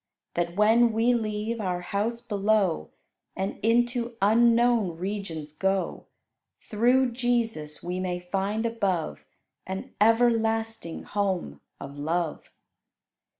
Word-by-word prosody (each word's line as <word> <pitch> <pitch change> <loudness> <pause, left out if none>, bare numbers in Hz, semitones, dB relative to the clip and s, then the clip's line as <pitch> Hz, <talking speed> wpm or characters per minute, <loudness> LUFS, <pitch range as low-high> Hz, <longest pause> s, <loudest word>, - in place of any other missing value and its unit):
That 170 0 -1
when 225 +3 +4
we 230 +3 +3
leave 220 0 -2
our 180 -3 -2
house 215 +6 -2
below, 200 - +1 0.5
And 190 +1 -3
into 240 +1 +1
unknown 230 -3 +3
regions 175 -5 -4
go, 190 +4 -1 0.5
Through 245 +4 +2
Jesus, 230 -11 -1
we 180 +1 -3
may 180 -1 -2
find 195 +5 -2
above 195 - -1 0.4
An 190 +1 -6
everlasting 225 -4 +2
home 190 - -2 0.2
of 140 +1 -8
love. 165 +1 -2
210 Hz, 105 wpm, -27 LUFS, 180-230 Hz, 0.5 s, when